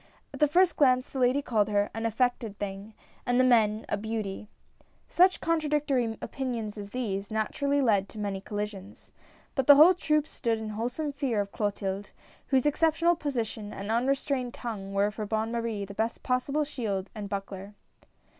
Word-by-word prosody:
At - - -8
the 300 - +5
first 355 +4 +3
glance 255 -3 +4
the 270 - -6
ladies 255 +3 +3
called 215 -3 +2
her 205 0 +1
"an 225 +1 -1
affected 230 -2 -1
thing," 200 +2 -6 0.3
and 245 0 +1
the - - +6
men 220 -4 +3
" - - -21
a - - 0
beauty." 215 -1 -4 0.6
Such 365 +2 +4
contradictory 295 -8 0
opinions 235 -6 -4
as 205 -2 -7
these, 205 -5 -3
naturally 280 +6 0
led 200 -5 +2
to - - -12
many 200 -2 -3
collisions. 205 -1 -6 0.4
But 270 -3 -1
the 285 - +10
whole 315 +6 +8
troupe 305 -4 +1
stood 230 -7 -2
in 220 -1 -5
wholesome 245 +8 -3
fear 270 -6 -1
of 200 0 -2
Clo 210 -2 0
tilde, 200 0 -4 0.4
whose 265 -1 +2
exceptional 325 +3 +3
position 230 -8 -3
and 200 +2 -5
unrestrained 255 +1 0
tongue, 205 -5 -6
were 200 +1 +2
for 215 0 -5
Bonne 220 +1 -1
Marie 230 -3 -2
the 200 - -9
best 225 +3 -2
possible 275 +4 0
shield 215 -9 -3
and 205 -2 -6
buckler. 195 0 -6
225 Hz, 175 wpm, -28 LUFS, 205-275 Hz, 0.6 s, the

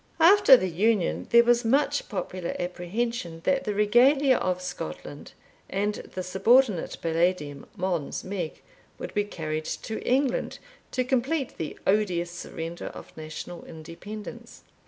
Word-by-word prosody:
After 335 -5 +8
the 185 - -1
Union, 195 +2 +1
there 235 0 +7
was 240 0 +3
much 285 +5 +1
popular 185 -3 -4
apprehension 180 0 -3
that 275 -1 +1
the 210 - -1
Regalia 255 +6 +5
of 180 -1 -1
Scotland, 80 - -7 0.4
and 205 +2 0 0.2
the 185 - -2
subordinate 200 +2 +3
Palladium, 165 -4 0
Mons 175 -5 -2
Meg, 185 -5 -5 0.3
would - - -7
be 205 - +2
carried 155 -5 -4
to 220 - -4
England 260 0 0 0.3
to 255 - 0
complete 265 +3 0
the 160 - -4
odious 185 -4 +1
surrender 170 0 -6
of - - -10
national 155 +2 -7
independence. 170 +7 -9
195 Hz, 130 wpm, -27 LUFS, 170-240 Hz, 0.4 s, After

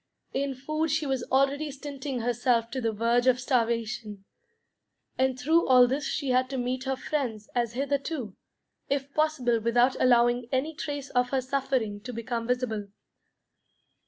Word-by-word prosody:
In 275 0 -1
food 310 +5 -2
she 305 +1 0
was 270 -2 -1
already 275 +3 +1
stinting 275 -2 -5
herself 235 0 +1
to 260 - -3
the 225 -1 0
verge 235 +3 +1
of 255 -1 +4
starvation. 230 -5 -1 0.9
And 260 0 +1
through 320 +6 +3
all 250 -1 +7
this 270 +4 -1
she 280 -3 -2
had 255 +1 +2
to 270 - -3
meet 255 +1 -2
her 265 0 0
friends 250 -7 -3
as 235 -2 0
hitherto, 275 - -2 0.5
if 280 0 -2
possible 290 -7 +1
without 240 +3 +3
allowing 240 -1 +3
any 275 +4 0
trace 290 -2 -5
of 250 0 +2
her 270 - +1
suffering 260 -5 -1
to 245 +3 -7
become 230 0 -3
visible. 245 -5 -1
255 Hz, 155 wpm, -27 LUFS, 235-275 Hz, 0.9 s, all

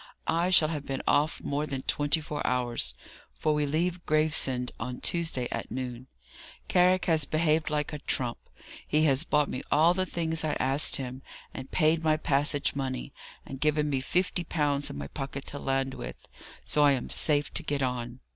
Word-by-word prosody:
I 170 +2 +1
shall 165 -4 +5
have 150 -3 -4
been 135 -1 -4
off 150 +2 +2
more 145 +2 -1
than 135 -2 -4
twenty 145 +2 +1
four 150 -1 -5
hours, 120 - 0 0.4
for 155 - +1
we 150 -1 +1
leave 170 +4 -1
Gravesend 150 -5 +2
on 125 +2 -4
Tuesday 165 -8 -1
at - - -4
noon. 125 -1 -5 0.6
Carrick 180 +1 +3
has 160 -4 +3
behaved 155 +1 +1
like 150 0 -1
a 150 - -4
trump. 125 -4 -1 0.5
He 150 +1 +2
has 140 -1 +3
bought 150 -3 +2
me 130 - -4
all 160 +4 +5
the 185 0 -1
things 160 -2 -1
I 155 - 0
asked 135 +3 +1
him, 130 -1 -4 0.3
and 130 0 -7
paid 160 +1 +2
my 155 -1 +3
passage 145 0 +1
money, 135 -1 -4 0.3
and 135 - -8
given 150 0 +2
me 135 - +1
fifty 180 +4 0
pounds 145 -4 0
in - - -7
my 70 - -5
pocket 135 - -6
to 145 - -5
land 135 -1 -1
with; - - -8 0.4
so 150 - +3
I 145 -1 +6
am 130 - -3
safe 145 -2 +2
to - - -1
get 145 -4 -1
on. 125 0 -3
145 Hz, 185 wpm, -28 LUFS, 130-155 Hz, 0.6 s, I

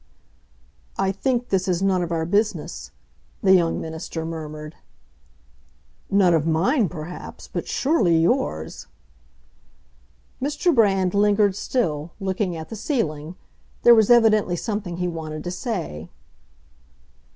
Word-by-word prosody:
"I 195 0 +1
think 245 +4 -1
this 190 -1 0
is 180 0 0
none 190 -2 +2
of 170 -1 -3
our 165 -1 0
business," 205 +5 -1 0.5
the 190 -1 +6
young 170 -3 +3
minister 160 0 -5
murmured. 155 -1 -7 1.4
"None 195 -3 +4
of 160 -1 +1
mine, 195 - +2
perhaps; 170 +1 -8
but - - -5
surely 225 - +2
yours!" 80 - -1 1.5
Mr. 295 +5 +1
Brand 195 -6 +3
lingered 205 -1 +3
still, 165 - -2
looking 190 -2 -2
at 160 0 -8
the - - -6
ceiling; 180 - -2 0.5
there 240 - +9
was 220 -3 +4
evidently 215 -6 +4
something 205 -3 -4
he 180 0 -1
wanted 155 -2 -5
to 175 - -4
say. 170 - -4
185 Hz, 120 wpm, -23 LUFS, 160-215 Hz, 1.5 s, there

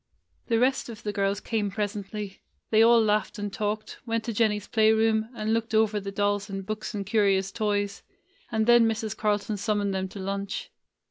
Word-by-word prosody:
The 230 - +2
rest 255 +1 +1
of 225 -2 -9
the 210 - -2
girls 200 0 0
came 215 -2 -1
presently. 205 0 -4 0.3
They 220 0 +5
all 230 +1 +7
laughed 215 0 +1
and 205 -1 -4
talked, 215 +1 -3
went 230 -1 -1
to 230 - -3
Jennie's 210 -2 +1
play 220 -1 +4
room, 220 0 +2
and 215 0 -1
looked 225 0 -1
over 215 -1 +3
the 195 0 -6
dolls 205 0 0
and 195 -1 -5
books 215 +1 -4
and 200 -1 -3
curious 195 -2 +2
toys, 205 -2 -1 0.5
and 220 -1 +1
then 240 -1 +6
Mrs. 220 -1 -2
Carlton 210 0 0
summoned 205 -1 0
them 190 0 -1
to 190 - -11
lunch. 195 +1 -4
210 Hz, 190 wpm, -27 LUFS, 200-220 Hz, 0.5 s, all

